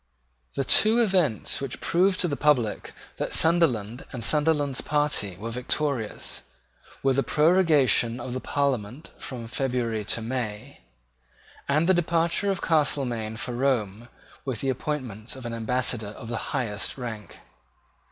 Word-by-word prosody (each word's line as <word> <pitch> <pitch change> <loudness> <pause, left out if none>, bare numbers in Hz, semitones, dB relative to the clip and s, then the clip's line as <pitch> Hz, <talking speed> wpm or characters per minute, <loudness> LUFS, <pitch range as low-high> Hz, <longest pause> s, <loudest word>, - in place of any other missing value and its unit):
The 140 - 0
two 220 - +5
events 185 - +1
which 135 -3 -4
proved 185 +2 +2
to 180 - +2
the 145 - -1
public 135 -8 +1 0.3
that - - 0
Sunderland 130 -9 +3
and 125 -4 -5
Sunderland's 145 -1 +2
party 145 -11 0
were 115 +4 -5
victorious 125 -1 -2 0.6
were 135 -1 +3
the 135 - +2
prorogation 150 - +3
of 120 0 -5
the 130 - -2
Parliament 135 -1 -2
from 120 -3 -6
February 120 -3 -1
to 115 - -1
May, 110 -3 -4 0.9
and 150 +4 +3
the 190 - +5
departure 170 +2 +1
of 195 -2 -1
Castelmaine 125 -8 0
for 125 - -4
Rome 120 -4 0 0.4
with 130 -5 -4
the 135 - 0
appointments 125 -5 -3
of 130 -2 -9
an 120 - -4
Ambassador 115 -1 -1
of 110 +2 -9
the 120 - -2
highest 115 -7 -2
rank. 115 -5 -7
130 Hz, 140 wpm, -26 LUFS, 115-150 Hz, 0.9 s, two